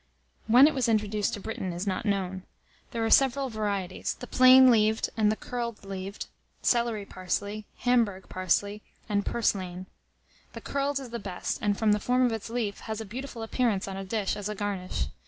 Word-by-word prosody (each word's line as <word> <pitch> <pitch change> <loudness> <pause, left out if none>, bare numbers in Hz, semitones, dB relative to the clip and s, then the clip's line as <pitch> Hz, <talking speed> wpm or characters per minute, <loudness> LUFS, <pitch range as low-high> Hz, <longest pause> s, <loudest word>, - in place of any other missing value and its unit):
When 245 +5 +8
it 305 - +4
was 250 -3 0
introduced 210 -1 0
to - - -8
Britain 190 -2 -4
is 175 +3 -4
not 195 +1 -2
known. 190 -2 -1 0.5
There 230 -1 -2
are 225 - 0
several 270 0 +4
varieties, 200 -4 -2
the - - -6
plain 255 0 +7
leaved 220 -1 +2
and 215 -1 +3
the - - 0
curled 235 -3 -5
leaved, 195 +1 -6 0.4
celery 235 -4 +1
parsley, 200 +3 -4
Hamburg 230 -6 +1
parsley, 200 +3 0 0.3
and 205 -1 0
purslane. 185 -6 -1 0.7
The - - -8
curled 280 0 -1
is 260 -4 -9
the 235 - -4
best, 190 -4 -4
and, 205 -1 +1
from 220 -2 +2
the 210 - +3
form 250 +4 +2
of 245 - +1
its 225 0 -4
leaf, 225 -4 -2
has 220 -1 -5
a 220 - -5
beautiful 235 +2 -6
appearance 225 -4 0
on 195 - -5
a 195 - -5
dish 200 +1 -1
as 205 0 -4
a 210 - -3
garnish. 195 -3 -3
215 Hz, 190 wpm, -28 LUFS, 195-235 Hz, 0.7 s, When